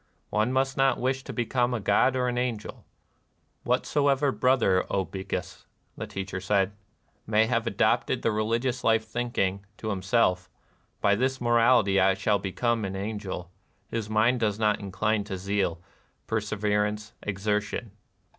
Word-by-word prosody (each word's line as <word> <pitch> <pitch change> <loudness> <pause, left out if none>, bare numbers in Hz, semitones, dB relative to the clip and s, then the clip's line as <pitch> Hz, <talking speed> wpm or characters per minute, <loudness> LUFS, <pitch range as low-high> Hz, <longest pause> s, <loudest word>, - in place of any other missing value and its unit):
One 110 +3 +1
must 135 +1 0
not 135 -2 +3
wish 130 +2 -1
to - - -5
become 120 0 0
a - - -2
god 130 +5 +3
or 125 -1 +1
an 125 - -1
angel. 120 -4 -4 0.4
" - - -44
Whatsoever 140 -1 +2
brother, 125 -9 +3
O 95 -1 0
Bhikkus," 95 0 -5 0.2
— - - -43
the - - -6
Teacher 95 -1 -5
said, 95 0 +1 0.2
— - - -42
" - - -41
may 110 0 +4
have 115 0 0
adopted 100 - +1
the 115 - +2
religious 115 +4 -1
life 110 0 +3
thinking, 110 -4 -1
to 110 - -3
himself, 95 -2 +1 0.3
' - - -41
By 100 - +4
this 130 +5 0
morality 120 -4 +4
I 95 0 +4
shall 100 +1 +1
become 115 +4 -1
an 95 -1 -3
angel^ 95 -3 -5 0.4
his 110 -2 -3
mind 110 +4 +3
does 105 -3 0
not 105 -1 +2
incline 105 +2 -1
to 95 -2 -4
zeal, 95 -3 -1 0.5
per 110 -1 -1
severance, 105 0 -1
exertion." 105 +2 -2
110 Hz, 165 wpm, -27 LUFS, 100-120 Hz, 0.5 s, may